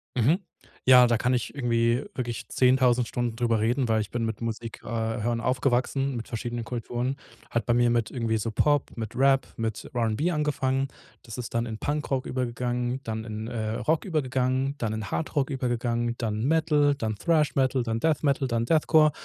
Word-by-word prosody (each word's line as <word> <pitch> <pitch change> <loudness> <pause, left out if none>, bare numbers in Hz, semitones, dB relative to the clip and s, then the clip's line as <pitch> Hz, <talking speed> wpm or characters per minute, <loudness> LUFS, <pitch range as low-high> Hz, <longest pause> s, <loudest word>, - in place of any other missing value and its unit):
Mhm, 140 - +3 0.5
ja, 125 -1 +8
da 120 - +2
kann 125 +3 +1
ich 120 -3 -1
irgendwie 120 -1 +1
wirklich 120 -3 -4
10.000 125 -2 +3
Stunden 120 -2 -2
drüber 115 -2 +1
reden, 120 +3 +1
weil 110 -1 +2
ich 105 - -5
bin 120 -1 -2
mit 110 -1 -4
Musik 115 0 -5
äh, - - -12
hören 115 +1 -1
aufgewachsen, 130 +2 0
mit 115 - -5
verschiedenen 120 0 -4
Kulturen. 120 +2 -3 0.4
Hat 115 -3 0
bei 120 - +3
mir 120 -1 +3
mit 115 -2 +1
irgendwie 115 -3 -1
so 110 +1 -2
Pop, 145 +5 +2
mit 110 -1 -5
Rap, 135 +1 +4
mit 110 -2 -3
R&B 120 +8 0
angefangen. 140 -4 0 0.3
Das 115 0 -9
ist 125 -2 -6
dann 115 0 0
in 110 -1 -5
Punkrock 145 -2 -2
übergegangen, 125 0 -2
dann 110 0 -4
in, 110 0 -5
äh, 110 -2 -3
Rock 155 +6 0
übergegangen, 135 -4 0
dann 110 -2 -1
in 110 -2 -5
Hard 80 0 -3
Rock 140 -1 +1
übergegangen, 120 -2 -1
dann 110 -2 -2
Metal, 150 -1 +3
dann 110 -5 -2
Thrash 155 +4 +2
Metal, 130 -1 +2
dann 115 -1 -2
Death 155 +3 +1
Metal, 140 -1 +2
dann 115 -1 0
Deathcore, 155 +1 +4
120 Hz, 185 wpm, -26 LUFS, 115-135 Hz, 0.5 s, ja